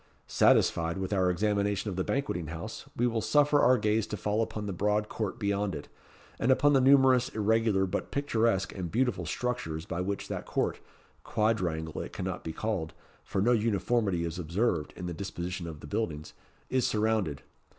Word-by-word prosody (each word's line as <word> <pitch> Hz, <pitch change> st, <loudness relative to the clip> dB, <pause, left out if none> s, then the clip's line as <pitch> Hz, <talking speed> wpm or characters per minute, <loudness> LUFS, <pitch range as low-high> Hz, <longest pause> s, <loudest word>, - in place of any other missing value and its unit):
Satisfied 85 Hz, +1 st, +3 dB
with 95 Hz, +1 st, -2 dB
our 95 Hz, -2 st, +3 dB
examination 100 Hz, +1 st, 0 dB
of -, -, -5 dB
the 95 Hz, -, 0 dB
Banqueting 130 Hz, -, -2 dB
House, 80 Hz, +1 st, -7 dB
we 120 Hz, -, +2 dB
will 115 Hz, -2 st, 0 dB
suffer 145 Hz, +2 st, +4 dB
our 130 Hz, -, +5 dB
gaze 105 Hz, -1 st, +1 dB
to 105 Hz, -, -4 dB
fall 105 Hz, +4 st, 0 dB
upon 105 Hz, -2 st, -3 dB
the 100 Hz, -, -3 dB
broad 105 Hz, +3 st, +1 dB
court 105 Hz, -3 st, -3 dB
beyond 100 Hz, -3 st, -1 dB
it, 70 Hz, -, -8 dB, 0.5 s
and 125 Hz, -, +3 dB
upon 145 Hz, +2 st, +4 dB
the 135 Hz, -, +5 dB
numerous 130 Hz, -2 st, +5 dB
irregular 110 Hz, -2 st, +2 dB
but 95 Hz, -, -3 dB
picturesque 115 Hz, -8 st, 0 dB
and 90 Hz, -3 st, -4 dB
beautiful 105 Hz, -5 st, 0 dB
structures 85 Hz, -8 st, -3 dB
by 85 Hz, -, -3 dB
which 100 Hz, +2 st, -3 dB
that -, -, -5 dB
court -, -, -1 dB, 0.4 s
quadrangle 90 Hz, -8 st, -1 dB
it -, -, -7 dB
cannot -, -, -4 dB
be 80 Hz, -, -4 dB
called, 95 Hz, -3 st, -3 dB, 0.3 s
for 95 Hz, -, -1 dB
no 120 Hz, -, +4 dB
uniformity 105 Hz, -4 st, +1 dB
is 85 Hz, +2 st, -4 dB
observed 85 Hz, -1 st, 0 dB
in 90 Hz, -, -6 dB
the 90 Hz, -, -3 dB
disposition 90 Hz, 0 st, -5 dB
of 80 Hz, -3 st, -8 dB
the -, -, -9 dB
buildings 80 Hz, -5 st, -3 dB, 0.3 s
is 130 Hz, -2 st, +1 dB
surrounded. 105 Hz, -, 0 dB
100 Hz, 180 wpm, -29 LUFS, 90-115 Hz, 0.5 s, our